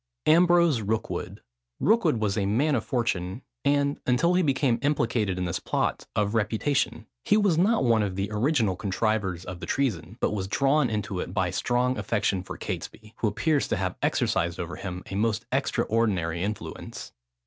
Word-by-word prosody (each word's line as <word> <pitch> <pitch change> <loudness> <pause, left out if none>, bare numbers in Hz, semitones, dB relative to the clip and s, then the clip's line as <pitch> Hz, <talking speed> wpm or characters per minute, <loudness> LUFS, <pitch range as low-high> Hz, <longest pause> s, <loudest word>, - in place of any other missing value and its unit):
AMBROSE 170 -5 +5
ROOKWOOD. 110 +2 -3 0.4
Rookwood 220 - +3
was 105 -3 0
a 100 -3 0
man 135 +9 +2
of 125 - +1
fortune, 105 -3 -2 0.2
and, 140 0 +2
until 145 +8 +3
he 180 - +3
became 135 -6 +1
implicated 115 -9 0
in 90 - -1
this 85 - -2
plot, - - -1
of 105 0 +1
reputation. 115 +3 0 0.2
He 210 - +3
was 205 -5 +3
not 200 +5 +3
one 115 -3 +3
of 100 -3 -2
the 100 +2 -2
original 110 - +1
contrivers 95 -2 -1
of 90 -1 -7
the - - -7
treason, 110 - -1
but - - +1
was 95 -2 -2
drawn 135 +5 +2
into 105 -3 -3
it 90 - -5
by 95 -3 +1
a - - -7
strong 125 +8 0
affection 105 -4 0
for 90 - -8
Catesby, 110 0 -6
who 115 - 0
appears 145 - +1
to - - -1
have - - -2
exercised 85 0 0
over 85 0 -4
him 90 -1 -6
a - - -4
most 110 +2 0
extraordinary 105 - 0
influence. 105 +2 -5
110 Hz, 175 wpm, -26 LUFS, 95-140 Hz, 0.4 s, AMBROSE